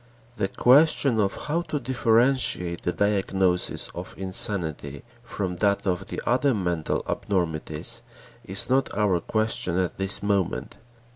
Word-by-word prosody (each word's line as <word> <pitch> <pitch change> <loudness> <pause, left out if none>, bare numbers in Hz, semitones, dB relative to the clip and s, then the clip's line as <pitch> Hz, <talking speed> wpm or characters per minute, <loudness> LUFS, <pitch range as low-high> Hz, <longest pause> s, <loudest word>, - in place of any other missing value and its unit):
The 100 - 0
question 135 0 +3
of 100 -2 -1
how 160 +3 0
to 155 -3 -4
differentiate 120 -7 +1
the 90 - -1
diagnosis 95 -2 0
of - - -5
insanity 90 -7 0 0.2
from 95 -6 -4
that 100 0 +1
of 90 -2 -2
the - - -5
other 130 +2 +2
mental 90 -5 -2
abnormities 85 +3 -3 0.4
is 95 +1 +2
not 130 +1 +1
our 100 -4 +2
question 110 -3 -1
at 95 0 -2
this 95 +1 +2
moment. 100 -3 -2
100 Hz, 130 wpm, -25 LUFS, 90-115 Hz, 0.4 s, question